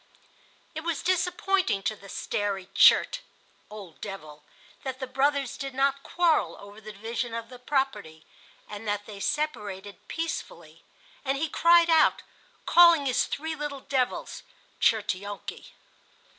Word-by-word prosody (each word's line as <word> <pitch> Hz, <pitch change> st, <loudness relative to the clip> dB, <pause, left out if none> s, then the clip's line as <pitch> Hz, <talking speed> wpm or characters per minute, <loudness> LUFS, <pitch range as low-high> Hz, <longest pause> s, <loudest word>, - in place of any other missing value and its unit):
It 315 Hz, -, -4 dB
was 335 Hz, -3 st, -2 dB
disappointing 370 Hz, -, +1 dB
to 215 Hz, -, -1 dB
the 200 Hz, -1 st, -14 dB
Stary 200 Hz, -2 st, -2 dB
Tchert -, -, +6 dB, 0.5 s
(Old 200 Hz, -6 st, -11 dB
Devil) 155 Hz, -7 st, -8 dB, 0.4 s
that 260 Hz, -1 st, -5 dB
the 260 Hz, -, -3 dB
brothers 270 Hz, +1 st, 0 dB
did 275 Hz, -2 st, -6 dB
not 275 Hz, +1 st, +1 dB
quarrel 335 Hz, +1 st, +1 dB
over 205 Hz, +2 st, -13 dB
the 215 Hz, 0 st, -9 dB
division 225 Hz, +3 st, -4 dB
of 230 Hz, 0 st, -6 dB
the 250 Hz, -, -11 dB
property, 250 Hz, -, -2 dB, 0.4 s
and 210 Hz, +1 st, -8 dB
that 205 Hz, 0 st, -1 dB
they 205 Hz, -2 st, -9 dB
separated 205 Hz, -8 st, -3 dB
peacefully; 330 Hz, 0 st, -5 dB, 0.4 s
and 270 Hz, 0 st, 0 dB
he 320 Hz, +3 st, 0 dB
cried 335 Hz, +2 st, +5 dB
out, 320 Hz, -1 st, +4 dB, 0.4 s
calling 340 Hz, -4 st, +7 dB
his 255 Hz, -2 st, +2 dB
three 320 Hz, +2 st, -3 dB
small 295 Hz, -2 st, -5 dB
devils 255 Hz, -2 st, -2 dB, 0.4 s
(Tchertionki). 205 Hz, -2 st, -1 dB
255 Hz, 130 wpm, -27 LUFS, 205-300 Hz, 0.5 s, calling